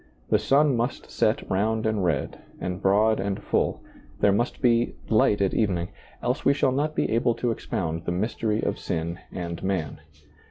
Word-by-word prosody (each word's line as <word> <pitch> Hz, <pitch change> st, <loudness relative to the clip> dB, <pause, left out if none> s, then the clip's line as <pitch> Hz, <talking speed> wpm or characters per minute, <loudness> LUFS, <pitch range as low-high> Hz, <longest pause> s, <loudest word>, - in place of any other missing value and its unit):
The -, -, +5 dB
sun 140 Hz, 0 st, +3 dB
must 120 Hz, +2 st, -3 dB
set -, -, +1 dB
round 110 Hz, +3 st, 0 dB
and 110 Hz, -3 st, 0 dB
red, 80 Hz, -6 st, -1 dB, 0.2 s
and 90 Hz, +1 st, -4 dB
broad 105 Hz, +3 st, +3 dB
and 100 Hz, +1 st, -2 dB
full; -, -, 0 dB, 0.4 s
there 100 Hz, -, +4 dB
must 120 Hz, +5 st, 0 dB
be 120 Hz, -2 st, +2 dB
" -, -, -21 dB
light 105 Hz, -1 st, +3 dB
at 95 Hz, -, +1 dB
evening," 90 Hz, -5 st, 0 dB, 0.3 s
else 125 Hz, +3 st, -1 dB
we 140 Hz, -, +4 dB
shall 135 Hz, -2 st, +2 dB
not 150 Hz, +4 st, -1 dB
be -, -, 0 dB
able 115 Hz, +1 st, +2 dB
to 120 Hz, +1 st, 0 dB
expound 85 Hz, -8 st, -3 dB
the -, -, -1 dB
mystery 105 Hz, +3 st, -1 dB
of -, -, -1 dB
sin 85 Hz, +1 st, -3 dB
and 85 Hz, -2 st, -5 dB
man. 95 Hz, -6 st, -2 dB
105 Hz, 185 wpm, -25 LUFS, 90-120 Hz, 0.4 s, The